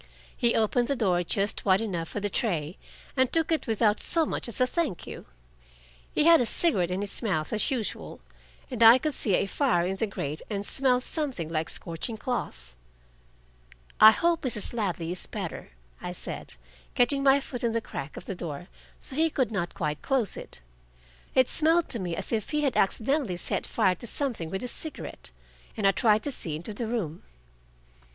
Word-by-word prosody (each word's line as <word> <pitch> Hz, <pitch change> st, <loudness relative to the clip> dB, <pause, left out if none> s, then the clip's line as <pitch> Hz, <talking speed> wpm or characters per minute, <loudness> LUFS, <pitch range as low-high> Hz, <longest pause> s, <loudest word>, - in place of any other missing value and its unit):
He 235 Hz, -1 st, +2 dB
opened 230 Hz, +2 st, +2 dB
the 280 Hz, -, 0 dB
door 185 Hz, -8 st, +2 dB
just 200 Hz, +3 st, -1 dB
wide 190 Hz, -1 st, +4 dB
enough 180 Hz, -7 st, -3 dB
for -, -, -4 dB
the 205 Hz, -, -1 dB
tray, 175 Hz, -6 st, -1 dB, 0.4 s
and 260 Hz, -2 st, +2 dB
took 330 Hz, 0 st, +1 dB
it 320 Hz, -, 0 dB
without 220 Hz, -1 st, +2 dB
so 330 Hz, -2 st, +1 dB
much -, -, -3 dB
as 235 Hz, -, -1 dB
a 255 Hz, -, +5 dB
"thank 255 Hz, -, -2 dB
you." -, -, -9 dB, 0.8 s
He -, -, +2 dB
had 330 Hz, -2 st, +7 dB
a 240 Hz, -, 0 dB
cigarette 205 Hz, -, +1 dB
in 185 Hz, +2 st, -2 dB
his 205 Hz, -1 st, -2 dB
mouth 175 Hz, -10 st, -1 dB
as 215 Hz, -, +1 dB
usual, 245 Hz, -6 st, -3 dB, 0.5 s
and 240 Hz, -3 st, -4 dB
I 230 Hz, +2 st, +10 dB
could 305 Hz, +2 st, -2 dB
see 205 Hz, -7 st, +1 dB
a -, -, +1 dB
fire 195 Hz, -5 st, +1 dB
in 190 Hz, +1 st, -2 dB
the 225 Hz, -, 0 dB
grate 150 Hz, -6 st, -4 dB
and 205 Hz, -2 st, -3 dB
smell 255 Hz, 0 st, +3 dB
something 255 Hz, -, -3 dB
like 160 Hz, -1 st, -2 dB
scorching 170 Hz, +7 st, -3 dB
cloth. 60 Hz, -, -4 dB, 1.2 s
"I 215 Hz, -, +11 dB
hope 335 Hz, +9 st, +2 dB
Mrs. 240 Hz, -5 st, -3 dB
Ladley 180 Hz, -7 st, -2 dB
is 180 Hz, -, -3 dB
better," -, -, -6 dB, 0.3 s
I -, -, -5 dB
said, -, -, -7 dB, 0.4 s
getting 260 Hz, +3 st, +3 dB
my 275 Hz, 0 st, +5 dB
foot 245 Hz, -3 st, -6 dB
in 230 Hz, -1 st, +1 dB
the 230 Hz, -, +1 dB
crack 140 Hz, -9 st, -7 dB
of -, -, -8 dB
the -, -, -4 dB
door, 175 Hz, -1 st, -6 dB, 0.3 s
so 260 Hz, -, -6 dB
he 325 Hz, +2 st, +3 dB
could 260 Hz, -7 st, 0 dB
not 175 Hz, -5 st, -3 dB
quite 150 Hz, -2 st, -2 dB
close 255 Hz, -7 st, +1 dB
it. -, -, -9 dB, 0.7 s
It 260 Hz, -1 st, +5 dB
smelled 325 Hz, +2 st, +3 dB
to 235 Hz, -, -1 dB
me 175 Hz, -3 st, -3 dB
as -, -, -3 dB
if 220 Hz, -3 st, -1 dB
he 300 Hz, -1 st, 0 dB
had 275 Hz, -4 st, +1 dB
accidentally 225 Hz, -, +1 dB
set -, -, -2 dB
fire 185 Hz, -, +2 dB
to 210 Hz, +7 st, -7 dB
something 235 Hz, -, -2 dB
with 190 Hz, +3 st, -3 dB
his 250 Hz, -, -3 dB
cigarette, 315 Hz, -, -6 dB, 0.5 s
and 210 Hz, -, -1 dB
I 195 Hz, -, +7 dB
tried 215 Hz, 0 st, +3 dB
to 290 Hz, -, -2 dB
see 160 Hz, -, -3 dB
into 175 Hz, +7 st, -4 dB
the 225 Hz, +2 st, -4 dB
room. 190 Hz, -9 st, -3 dB
220 Hz, 195 wpm, -27 LUFS, 180-260 Hz, 1.2 s, I